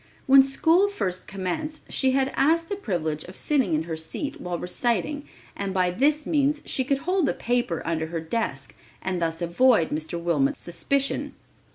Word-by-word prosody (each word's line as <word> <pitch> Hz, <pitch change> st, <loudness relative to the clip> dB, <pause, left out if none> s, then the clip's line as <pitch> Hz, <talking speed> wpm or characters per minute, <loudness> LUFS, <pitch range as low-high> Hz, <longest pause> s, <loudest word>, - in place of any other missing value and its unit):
When 270 Hz, 0 st, +8 dB
school 325 Hz, +8 st, +3 dB
first 185 Hz, -, -3 dB
commenced 195 Hz, -, -4 dB
she 260 Hz, -1 st, +1 dB
had 270 Hz, 0 st, +1 dB
asked 330 Hz, +4 st, +2 dB
the 405 Hz, -, -1 dB
privilege 160 Hz, -, -2 dB
of 185 Hz, -, -11 dB
sitting 265 Hz, -, +1 dB
in 155 Hz, -, 0 dB
her 165 Hz, -1 st, -4 dB
seat 160 Hz, -, -5 dB
while 180 Hz, -1 st, -3 dB
reciting 240 Hz, -, -1 dB, 0.3 s
and 195 Hz, -1 st, -4 dB
by 180 Hz, -1 st, +2 dB
this 295 Hz, +9 st, +2 dB
means 295 Hz, -1 st, +2 dB
she 260 Hz, -, 0 dB
could 275 Hz, +1 st, +1 dB
hold 365 Hz, -2 st, +2 dB
the -, -, 0 dB
paper 240 Hz, -8 st, -1 dB
under 160 Hz, -1 st, -1 dB
her 165 Hz, 0 st, -3 dB
desk 225 Hz, +9 st, -3 dB, 0.3 s
and 185 Hz, -2 st, -2 dB
thus 165 Hz, +1 st, -1 dB
avoid 175 Hz, +1 st, +4 dB
Mr. 155 Hz, +3 st, -3 dB
Wilmot's 165 Hz, -5 st, +1 dB
suspicion. 275 Hz, +11 st, -1 dB
225 Hz, 175 wpm, -25 LUFS, 170-285 Hz, 0.3 s, When